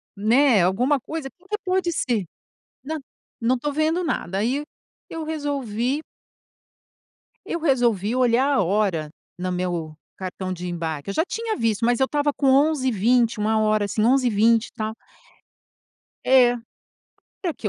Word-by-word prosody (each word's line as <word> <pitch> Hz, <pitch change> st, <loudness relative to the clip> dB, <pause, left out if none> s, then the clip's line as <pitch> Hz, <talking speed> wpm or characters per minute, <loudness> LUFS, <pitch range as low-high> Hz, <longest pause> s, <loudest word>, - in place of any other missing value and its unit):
Né, 225 Hz, +1 st, +4 dB
alguma 250 Hz, +11 st, +2 dB
coisa 315 Hz, +2 st, -5 dB
o 375 Hz, -, -24 dB
que 425 Hz, -, -2 dB
pode 370 Hz, -2 st, 0 dB
ser? 240 Hz, -, -1 dB, 0.6 s
Não, 315 Hz, +2 st, -3 dB, 0.4 s
não 245 Hz, +2 st, +2 dB
tô 290 Hz, +3 st, -3 dB
vendo 315 Hz, +4 st, +1 dB
nada!", 195 Hz, -, -2 dB
aí 255 Hz, +8 st, 0 dB, 0.4 s
eu 325 Hz, -1 st, -5 dB
resolvi 280 Hz, -4 st, -2 dB, 1.4 s
eu 340 Hz, -, -3 dB
resolvi 240 Hz, -, +1 dB
olhar 255 Hz, +2 st, +3 dB
a 210 Hz, -, +3 dB
hora 185 Hz, -5 st, 0 dB, 0.3 s
no 185 Hz, 0 st, -2 dB
meu 175 Hz, -4 st, -3 dB, 0.2 s
cartão 185 Hz, 0 st, -5 dB
de 180 Hz, 0 st, -5 dB
embarque. 165 Hz, -2 st, -4 dB
Eu -, -, -2 dB
já 320 Hz, -, +2 dB
tinha 450 Hz, +2 st, -3 dB
visto, 230 Hz, -1 st, 0 dB
mas 240 Hz, +1 st, +2 dB
eu 265 Hz, -, +4 dB
estava 290 Hz, +1 st, 0 dB
com 275 Hz, -, 0 dB
11:20, 255 Hz, -5 st, +3 dB
13:00 215 Hz, -1 st, +2 dB
assim, 215 Hz, +2 st, -1 dB
11:20, 230 Hz, -2 st, +3 dB
e -, -, -18 dB
tal 220 Hz, 0 st, -3 dB, 1.3 s
é. 250 Hz, -2 st, +5 dB, 0.9 s
No 345 Hz, -, 0 dB
que 215 Hz, -, -3 dB
240 Hz, 145 wpm, -23 LUFS, 205-290 Hz, 1.4 s, é